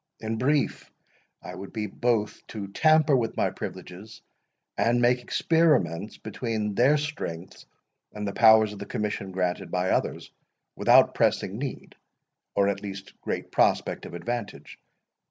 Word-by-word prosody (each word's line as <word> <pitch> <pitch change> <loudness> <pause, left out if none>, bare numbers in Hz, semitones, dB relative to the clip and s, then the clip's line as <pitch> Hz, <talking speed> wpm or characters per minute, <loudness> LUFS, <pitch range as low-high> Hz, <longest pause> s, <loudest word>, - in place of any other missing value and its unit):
In 110 0 -3
brief, 145 +1 0 0.5
I 90 - -8
would 95 +2 -9
be 110 -2 -2
both 110 0 -1
to 105 -3 -6
tamper 155 +5 +4
with 120 -3 -1
my - - +1
privileges, 100 +5 -9 0.5
and 120 +1 +2
make 125 +1 +3
experiments 120 - +1
between 110 -1 -3
their 130 +8 +4
strength, 95 - -6 0.5
and 105 -1 -5
the 100 - -3
powers 110 -1 +6
of 100 - -10
the 100 - -7
commission 105 -2 -3
granted 90 -1 -2
by 90 0 0
others, - - -1 0.4
without - - +5
pressing 100 +4 0
need, 135 -1 -6 0.6
or 100 0 +3
at 100 0 -1
least 100 -1 -8
great - - -4
prospect - - +1
of - - -9
advantage. 100 -4 -6
105 Hz, 140 wpm, -26 LUFS, 100-120 Hz, 0.6 s, powers